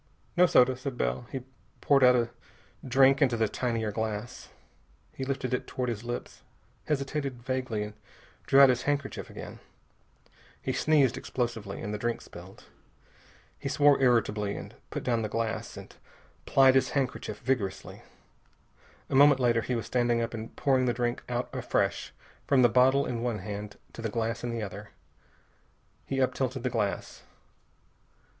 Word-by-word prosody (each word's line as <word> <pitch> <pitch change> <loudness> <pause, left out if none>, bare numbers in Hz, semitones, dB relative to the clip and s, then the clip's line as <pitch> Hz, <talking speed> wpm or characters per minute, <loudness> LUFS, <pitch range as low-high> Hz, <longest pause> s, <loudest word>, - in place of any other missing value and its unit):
"No 180 0 +6
soda," 130 -4 +5
said 130 0 -6
Bell. 60 +1 -2
He 135 - -4 0.4
poured 140 -2 +3
out 125 0 +7
a 120 -1 0 0.5
drink 135 +1 +4
into 125 -4 +3
the 110 -1 +2
tinier 115 -1 -2
glass. 110 +1 -4 0.6
He 135 - -5
lifted 130 -1 -2
it 125 - -2
toward 125 -1 -3
his 115 -2 -4
lips, 120 0 -6 0.5
hesitated 140 -3 -2
vaguely, 130 -4 -2
and 105 0 -7 0.5
drew 135 - +6
out 135 - +9
his 125 -1 +2
handkerchief 145 -2 -2
again. - - -9 1.0
He - - -3
sneezed 145 -5 +3
explosively, 115 -5 -4
and 105 - -4
the 105 - -3
drink 120 +1 -2
spilled. - - -13 1.0
He 140 - -4
swore 145 -1 +4
irritably, 110 -5 +1 0.2
put - - -5
down 120 -2 +1
the 110 - -3
glass, 115 0 -3
and - - -11 0.5
plied 135 -1 +6
his 130 - +3
handkerchief 130 -2 -2
vigorously. 125 -7 -3 1.1
A - - -7
moment 140 0 +6
later 120 -2 +3
he 125 - -2
was 115 - -3
standing 120 -1 +1
up 115 0 -2
and 115 0 -7
pouring 130 -3 +2
the 120 - +2
drink 120 -1 -1
out 120 0 -1
afresh, - - -1 0.4
from 135 -3 +4
the 120 - +6
bottle 130 +4 +4
in 120 -2 -3
one 120 -2 -1
hand 105 +1 -7 0.2
to - - -8
the 115 - -2
glass 115 +2 -2
in 120 - -2
the 115 -2 -3
other. 100 +1 -7 1.2
He 135 - -2
up 130 - +2
tilted 130 -1 -2
the 125 - -1
glass. 105 -4 -2
125 Hz, 160 wpm, -28 LUFS, 115-135 Hz, 1.2 s, out